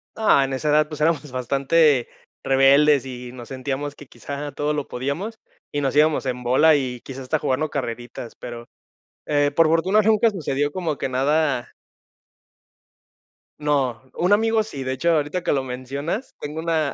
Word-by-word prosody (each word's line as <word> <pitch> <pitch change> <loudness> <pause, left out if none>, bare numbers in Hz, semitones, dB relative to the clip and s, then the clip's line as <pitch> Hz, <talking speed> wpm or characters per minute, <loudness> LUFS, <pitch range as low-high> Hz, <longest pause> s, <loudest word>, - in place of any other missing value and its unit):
No, 210 -11 +4
en 135 - -3
esa 140 +3 -1
edad, 150 +1 +3
pues, 155 - -7
éramos 150 -3 0
bastante 135 +2 +2 0.3
rebeldes, 135 +1 +5
y 125 -1 -7
nos 120 -2 -10
sentíamos 135 +2 -4
que 145 - -13
quizá 145 0 -6
todo 150 +2 -1
lo 145 -2 -3
podíamos, 165 - -4 0.3
y 145 - -1
nos 140 0 -1
íbamos 150 -2 +3
en 125 -1 -3
bola, 150 +6 +5
y 125 -3 -2
quizás, 135 0 -8
hasta 125 - -1
jugando 145 +4 0
carreritas, 120 -3 -5
pero, 120 -1 -9 0.6
eh, 145 -1 +2
por 165 +1 +4
fortuna 185 +6 +3
nunca 220 +2 +4
sucedió 145 -6 -2
como 165 -5 -2
que - - -3
nada 140 0 0 1.9
No, 135 -6 0
un 180 +4 +2
amigo 225 +1 +3
sí, 140 -11 -7
de 130 0 -2
hecho, 170 +6 +1
ahorita 155 +3 0
que - - +1
lo 135 -2 +1
mencionas, 140 - -5
tengo 150 +2 -5
una 160 -3 0
145 Hz, 165 wpm, -22 LUFS, 130-155 Hz, 1.9 s, rebeldes